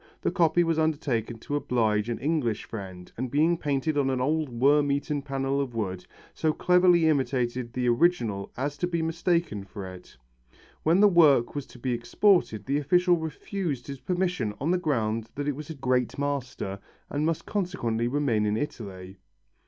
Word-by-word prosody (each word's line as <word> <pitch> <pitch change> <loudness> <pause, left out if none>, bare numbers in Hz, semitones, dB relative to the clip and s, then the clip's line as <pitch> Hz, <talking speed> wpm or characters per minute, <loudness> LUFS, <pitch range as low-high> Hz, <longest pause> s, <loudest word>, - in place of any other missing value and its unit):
The - - 0
copy 175 -2 +3
was 165 -1 +1
undertaken 140 -7 -1
to 145 +6 -4
oblige 110 -6 +1
an 120 - -2
English 140 -8 -1
friend, 95 -4 -8
and 130 +2 -3
being 155 +6 +3
painted 145 -1 -1
on 135 -1 +2
an 130 -1 0
old 150 +3 0
worm 140 +4 +3
eaten 145 +1 -1
panel 135 0 -1
of 130 -4 -4
wood, 95 -5 -3 0.3
so 155 -1 0
cleverly 180 -1 +4
imitated 125 -4 0
the 125 0 -1
original 120 - +1
as 145 +3 -3
to 175 - 0
be 170 -2 -1
mistaken 165 - 0
for 100 0 -8
it. 95 -5 -11 0.6
When 170 +5 +3
the 210 - +8
work 155 -10 +5
was 145 -2 -5
to - - -14
be 125 +1 -2
exported 120 - +2
the 140 +2 +1
official 175 +4 +3
refused 160 -3 -4
his 140 -2 -7
permission 180 - -1
on 155 +5 0
the 180 - +2
ground 115 -8 -1
that 145 0 -3
it 145 - 0
was 150 +1 -8
by 160 - -7
a - - -18
great 125 -2 0
master 130 -8 -3 0.3
and 145 +1 -1
must 160 0 -1
consequently 120 - -1
remain 120 -6 +1
in 105 +1 0
Italy. 95 -8 -6
140 Hz, 180 wpm, -27 LUFS, 115-160 Hz, 0.6 s, the